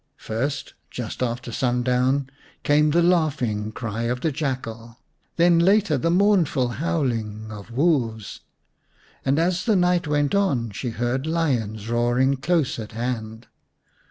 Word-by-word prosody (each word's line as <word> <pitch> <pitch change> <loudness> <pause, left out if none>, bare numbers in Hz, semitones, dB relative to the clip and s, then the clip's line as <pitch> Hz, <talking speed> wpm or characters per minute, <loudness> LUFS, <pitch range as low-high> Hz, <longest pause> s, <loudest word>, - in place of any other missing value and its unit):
First, 135 +6 -3 0.2
just 120 -1 -6
after 120 0 -2
sundown, 125 +3 +1 0.4
came 150 +1 +4
the 170 +3 +3
laughing 140 -12 +1
cry 115 0 -4
of 125 +1 -2
the 160 - 0
jackal; 120 -5 -4 0.4
then 170 0 +4
later 195 -1 +3
the 140 +5 0
mournful 175 -8 +3
howling 115 -10 -2
of 105 0 -9
wolves; 120 - 0 0.8
and 135 +2 +1
as 175 +2 +1
the 220 -3 +3
night 180 -2 +2
went 145 -1 +1
on 140 - +1
she 120 +5 -4
heard 120 +5 -2
lions 120 -11 -1
roaring 120 +3 +2
close 155 -2 0
at 110 -1 -7
hand. 115 -1 -4
130 Hz, 130 wpm, -23 LUFS, 115-165 Hz, 0.8 s, came